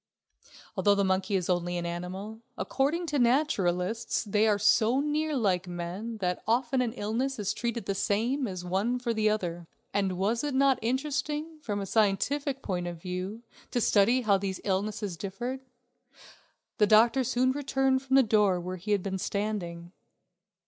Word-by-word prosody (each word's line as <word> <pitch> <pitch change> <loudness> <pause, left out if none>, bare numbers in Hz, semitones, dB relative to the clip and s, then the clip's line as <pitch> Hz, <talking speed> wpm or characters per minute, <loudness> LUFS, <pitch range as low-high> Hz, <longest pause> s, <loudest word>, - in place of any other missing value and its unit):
Although 205 -1 +3
the 200 - +2
monkey 190 +1 +1
is 180 -3 0
only 175 -1 0
an 175 - -3
animal, 185 +6 -5 0.2
according 300 +6 0
to 295 -3 -1
naturalists 230 - +1
they 210 0 +2
are 210 -1 +3
so 220 +4 +3
near 300 +1 0
like 190 -6 +1
men 180 +6 -5
that 180 -3 -2
often 250 +3 +2
an 240 -2 0
illness 245 +4 -2
is 205 -2 -1
treated 235 -3 -3
the 200 - -1
same 230 +7 0
for 180 -2 -6
one 200 +7 0
as 250 - -6
for 235 -2 0
the 215 -1 +2
other. 175 -5 -2 0.3
And 195 -2 0
was 220 +6 0
it 290 -2 -2
not 270 -1 +4
interesting, 295 +5 -2
from 205 -7 -3
a 200 - -3
scientific 265 +8 +1
point 180 -3 -2
of 170 -1 -6
view, 185 +6 -5 0.3
to 245 - 0
study 225 +3 +4
how 200 -4 +3
these 190 -1 -3
illnesses 200 -1 -2
differed. 240 +8 -4 1.2
The 210 - +5
doctor 230 +5 +5
soon 255 +1 +2
returned 270 -1 +1
from 265 0 0
the 270 - +7
door 210 -5 +3
where 180 +1 -5
he 205 +4 -1
had 200 -3 +1
been 190 -1 -3
standing. 180 -5 -3
215 Hz, 170 wpm, -28 LUFS, 190-255 Hz, 1.2 s, the